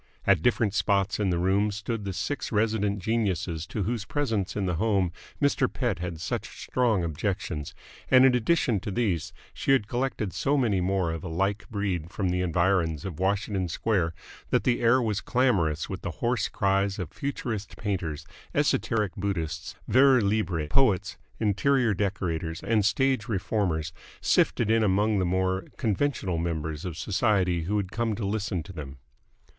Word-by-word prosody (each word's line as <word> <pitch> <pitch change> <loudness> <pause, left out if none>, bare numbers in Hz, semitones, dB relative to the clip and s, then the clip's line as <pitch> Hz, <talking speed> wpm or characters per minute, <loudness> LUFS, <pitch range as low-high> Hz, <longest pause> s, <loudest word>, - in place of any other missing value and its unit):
At 100 -5 +4
different 110 -1 +2
spots 100 -1 +1
in 100 -2 +1
the 85 - +1
room 95 +4 +2
stood 105 +1 -4
the 100 - -3
six 115 +10 -3
resident 105 -2 +1
geniuses 95 -7 -1
to 105 - -2
whose 115 +2 -2
presence 115 -8 -1
in 100 - -1
the 90 -3 -1
home 100 -3 +1 0.3
Mr. 140 -2 +2
Pett 120 -9 -1
had 85 -2 -4
such 80 - -4
strong 115 -8 +1
objections, 85 -2 -3 0.3
and 130 0 +7
in 130 - +6
addition 125 -3 +2
to 100 - -6
these 100 -7 -1 0.2
she 135 - +1
had 110 -7 +2
collected 120 -5 -2
so 145 +1 +1
many 110 -8 +2
more 95 -2 +1
of 80 -1 -5
a - - -4
like 95 +6 -1
breed 95 -6 -2
from 95 0 -1
the 90 +1 0
environs 85 -3 +1
of 90 -5 -6
Washington 95 0 0
Square 85 -2 0 0.3
that - - +2
the 120 -1 +1
air 120 +2 +5
was 110 -4 -1
clamorous 95 - +1
with - - -5
the - - -3
hoarse - - 0
cries 100 0 +1
of 90 -4 -5
futurist 115 -7 -4
painters, 80 -7 -3 0.3
esoteric 105 -5 +1
Buddhists, 80 -6 -3
vers 130 0 +5
libre 90 -7 0
poets, 100 - +2 0.2
interior 115 +3 +2
decorators, 90 -4 -2
and 110 0 +2
stage 130 +2 +1
reformers, 90 -7 -1 0.3
sifted 110 -2 +2
in 115 0 +4
among 105 +1 +2
the 95 - +1
more 95 +1 0
conventional 105 - 0
members 80 -2 -3
of 85 -3 -5
society 90 -4 +1
who 105 +4 0
had 95 -3 -2
come 115 -2 -1
to 110 - -3
listen 100 -4 -2
to 95 - -10
them. 70 -4 -8
100 Hz, 165 wpm, -27 LUFS, 90-110 Hz, 0.3 s, and